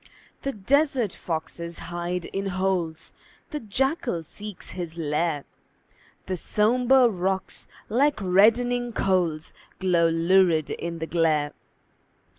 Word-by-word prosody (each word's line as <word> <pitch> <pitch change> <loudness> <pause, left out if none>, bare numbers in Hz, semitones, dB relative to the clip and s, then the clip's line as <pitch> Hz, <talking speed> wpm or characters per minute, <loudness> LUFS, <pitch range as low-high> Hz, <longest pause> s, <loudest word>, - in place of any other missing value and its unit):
The 275 - -2
desert 255 - +1
foxes 170 +1 -5 0.2
hide 175 0 -2
in 195 0 -3
holes, 185 -4 -1 0.4
The 300 - -3
jackal 240 - -1
seeks 210 +4 -8
his 170 -2 -6
lair; 150 -1 -1 0.8
The 190 - -2
sombre 245 +7 +3
rocks, 190 -2 -2 0.2
like 275 +6 +2
reddening 235 +6 +3
coals, 175 -7 0 0.2
Glow 175 -3 +3
lurid 165 -1 +3
in 170 0 -4
the 160 - -3
glare. 155 -3 +1
185 Hz, 105 wpm, -25 LUFS, 165-225 Hz, 0.8 s, sombre